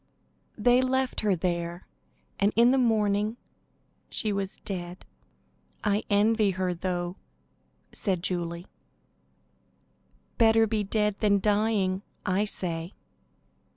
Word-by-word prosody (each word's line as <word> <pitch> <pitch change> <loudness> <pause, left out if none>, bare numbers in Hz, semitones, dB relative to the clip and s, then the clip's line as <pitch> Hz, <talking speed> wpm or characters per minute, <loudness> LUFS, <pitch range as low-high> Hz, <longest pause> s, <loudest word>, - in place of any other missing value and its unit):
They 245 +3 +4
left 260 0 0
her 205 -3 +2
there, 170 0 -3 0.5
and 200 +1 +3
in 235 +2 +6
the 265 - +3
morning 215 -2 +1 0.7
she 215 -3 -1
was 195 -1 -3
dead. 180 -2 -6 0.8
"I 205 0 +2
envy 210 +1 +3
her, 185 -1 -1
though," 175 0 -3 0.8
said 185 -4 -1
Julie. 170 -1 -2 1.7
"Better 225 -1 +5
be 215 -1 -1
dead 210 0 0
than 200 -1 +3
dying, 205 -2 +1 0.2
I 195 +2 +1
say." 170 -3 -4
200 Hz, 105 wpm, -27 LUFS, 185-220 Hz, 1.7 s, in